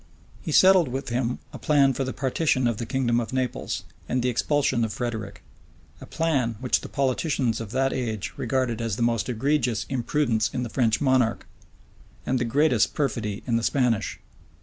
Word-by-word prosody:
He - - -4
settled 185 -4 +6
with 130 +2 -4
him 120 0 -1 0.2
a - - -8
plan 140 -3 +3
for 135 - -2
the 130 - -3
partition 130 0 0
of 115 -3 +1
the 115 - -5
kingdom 120 -2 +1
of 115 - -4
Naples, 130 -2 -2 0.3
and 125 -1 0
the 125 - +2
expulsion 130 0 +1
of 110 - -1
Frederick; 110 -4 -5 0.6
a - - -10
plan 135 -8 0
which 125 0 +1
the - - -8
politicians 130 -4 0
of 115 - -6
that, 135 +3 0
age 110 -5 -3
regarded 125 -4 -1
as 115 -3 -1
the 120 - -1
most 115 -1 0
egregious 125 -1 0
imprudence 120 -3 0
in 125 -1 -2
the 120 - -4
French 115 -2 +1
monarch, 130 -5 +2 0.8
and 130 0 0
the 120 - 0
greatest 125 -2 +2
perfidy 115 -7 -2
in 120 -2 +1
the 115 - -2
Spanish. 125 -4 0
125 Hz, 180 wpm, -25 LUFS, 115-135 Hz, 0.8 s, settled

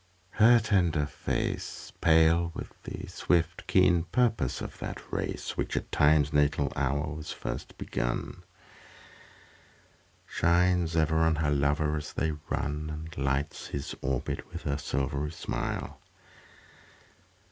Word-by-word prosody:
Her 115 +2 +6
tender 90 -9 +2
face, 70 - -3
Pale 80 +1 +4
with - - -6
the - - -6
swift, 85 0 0
keen 90 -3 +4
purpose 110 - +1
of - - -7
that - - -5
race - - -3
Which - - -2
at - - -3
Time's 75 0 +4
natal 75 -1 +2
hour 70 +2 0
was 75 0 -6
first - - -6
begun, - - -3 1.8
Shines 85 -1 +2
ever 80 -1 +2
on 80 0 +3
her 75 -1 0
lover 75 +2 +1
as 75 0 -6
they 80 - 0 0.2
run 75 +2 -2
And 80 +1 -7
lights 70 +2 -1
his 70 0 -4
orbit 70 +1 -2
with 85 0 -7
her 70 -1 -1
silvery 70 +2 -1
smile. 80 - -4
75 Hz, 125 wpm, -29 LUFS, 70-85 Hz, 1.8 s, Her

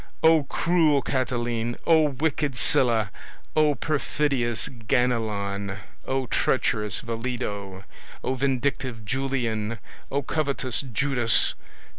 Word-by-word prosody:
O, 160 -2 +5
cruel 155 -2 +2
Catiline! 120 -3 -1
O, 160 -2 +5
wicked 140 -1 -1
Sylla! 115 -5 +1 0.4
O, 155 -2 +4
perfidious 140 -6 0
Ganelon! 110 -5 -1 0.3
O, 135 0 0
treacherous 105 -5 0
Vellido! 115 -5 -4 0.4
O, 130 - 0
vindictive 130 -3 -1
Julian! 115 -4 -1 0.3
O, 140 +1 -1
covetous 140 -4 0
Judas! 130 -3 +3
125 Hz, 90 wpm, -25 LUFS, 115-140 Hz, 0.4 s, O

